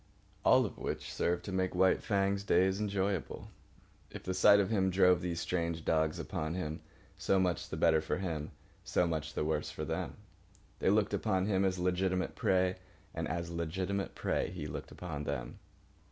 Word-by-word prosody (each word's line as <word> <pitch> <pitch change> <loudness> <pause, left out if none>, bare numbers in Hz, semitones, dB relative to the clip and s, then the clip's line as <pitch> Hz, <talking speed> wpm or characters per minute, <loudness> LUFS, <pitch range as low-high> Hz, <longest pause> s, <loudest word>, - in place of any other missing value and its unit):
All - - +5
of - - -7
which - - -4
served 85 0 0
to 100 - -5
make 95 -1 -1
White 95 +1 +4
Fang's 100 -1 +1
days 95 0 +3
enjoyable. 100 -3 -2 0.6
If - - -9
the 95 - -2
sight 100 +2 +6
of 100 +1 +1
him 95 -3 +2
drove 90 -1 +4
these 85 -2 -2
strange 85 -1 -2
dogs 80 -1 +1
upon 80 +2 -3
him, 80 -4 -4 0.4
so 95 - +2
much 90 -2 0
the - - -4
better 80 -2 +4
for 80 - -2
him, 80 -6 -3 0.3
so 90 - +1
much 80 -2 -3
the 75 - 0
worse 80 - -1
for - - -5
them. - - -3 0.6
They - - +2
looked 105 +1 +2
upon 95 -4 +1
him 100 -2 +2
as 95 -1 +1
legitimate 90 +1 0
prey, 95 0 +2 0.4
and - - -3
as 85 +1 -3
legitimate 95 +4 -2
prey - - -1
he 85 -5 -6
looked 75 -1 -6
upon 75 -5 -6
them. - - -4
90 Hz, 180 wpm, -33 LUFS, 85-95 Hz, 0.6 s, sight